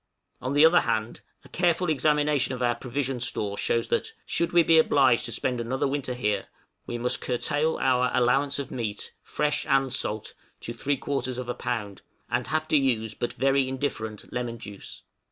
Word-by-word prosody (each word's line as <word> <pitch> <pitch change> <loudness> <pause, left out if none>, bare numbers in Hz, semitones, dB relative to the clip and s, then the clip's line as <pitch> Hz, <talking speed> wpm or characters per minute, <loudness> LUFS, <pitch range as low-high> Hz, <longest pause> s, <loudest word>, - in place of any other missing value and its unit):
On 130 +2 -2
the 145 +2 +7
other 175 +2 +6
hand, 115 -1 -2 0.2
a - - -14
careful 175 0 +1
examination 150 -3 +2
of 125 - -3
our 120 0 +3
provision 130 +1 -3
store 105 -3 -2
shows 115 +3 0
that, - - -1
should 170 0 0
we 175 -1 +5
be 165 0 +6
obliged 135 -7 +4
to 120 - -4
spend 125 0 -1
another 130 +4 -1
winter 135 -2 -2
here, 105 -4 -1 0.4
we 120 - -3
must 125 +1 -1
curtail 145 +5 0
our 125 -1 +2
allowance 135 +3 +2
of 140 - -5
meat 110 -4 -4
fresh 150 0 -1
and 135 -1 +2
salt 110 -5 -2 0.3
to 115 - -5
three 140 +4 -1
quarters 130 -2 -2
of 125 -1 -5
a - - 0
pound, 105 -7 -4 0.3
and - - 0
have 155 0 -1
to 155 - +5
use 115 -6 +1
but 120 - -3
very 135 -1 +2
indifferent 120 -6 -4
lemon 120 -1 -3
juice. 105 -3 -10
130 Hz, 185 wpm, -26 LUFS, 120-145 Hz, 0.4 s, the